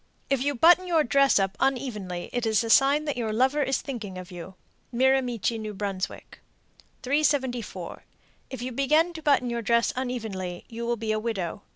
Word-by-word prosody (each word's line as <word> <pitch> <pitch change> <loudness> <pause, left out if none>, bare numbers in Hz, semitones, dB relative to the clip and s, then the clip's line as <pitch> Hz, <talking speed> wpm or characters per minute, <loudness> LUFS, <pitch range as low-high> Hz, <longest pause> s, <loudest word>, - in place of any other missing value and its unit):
If 275 -2 +2
you 285 +1 0
button 350 +7 +5
your 330 -3 +3
dress 275 +1 +4
up 195 -1 0
unevenly, 215 -10 -2
it 245 -2 -1
is 220 0 +2
a 225 - -1
sign 280 +5 +5
that 290 -4 -2
your 225 -3 -2
lover 260 +6 +2
is 270 -1 0
thinking 215 -9 -6
of 185 +1 -9
you. 180 +1 -9 0.4
Miramichi, 250 -3 +1
N.B. 215 -1 -5
374. 245 +6 -4 0.5
If 260 -2 -6
you 255 - -4
begin 305 +7 +2
to 320 - -8
button 275 -5 +2
your 235 0 -2
dress 235 +1 +2
unevenly, 220 -9 -4
you 235 0 -6
will 240 0 0
be 220 0 -2
a 215 - 0
widow. 205 -4 -3
240 Hz, 175 wpm, -26 LUFS, 215-275 Hz, 0.5 s, button